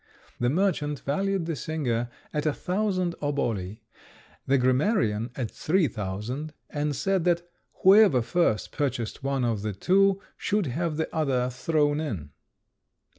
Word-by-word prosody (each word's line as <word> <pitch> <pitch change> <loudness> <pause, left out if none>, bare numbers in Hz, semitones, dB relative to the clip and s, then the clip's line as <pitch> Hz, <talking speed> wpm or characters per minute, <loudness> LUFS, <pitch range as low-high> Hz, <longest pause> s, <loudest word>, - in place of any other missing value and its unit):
The 120 - +2
merchant 150 -3 0
valued 195 +5 0
the 165 -1 -2
singer 120 -5 -2 0.2
at 150 0 0
a 150 - +2
thousand 185 -1 -1
oboli, 115 -8 -2 0.7
the 135 - +4
grammarian 130 - +2
at 120 -5 -3
three 175 0 +1
thousand, 110 +9 -5 0.2
and 145 -1 -1
said 195 +4 +1
that 175 -1 +1 0.4
whoever 190 - +7
first 170 -7 +1
purchased 125 -6 -2
one 135 -2 0
of 115 -4 0
the 105 0 -2
two 195 - +3 0.2
should 205 -2 0
have 155 +4 -2
the 160 - -3
other 130 -5 +1
thrown 145 +3 +1
in. 95 - -4
145 Hz, 135 wpm, -27 LUFS, 120-175 Hz, 0.7 s, whoever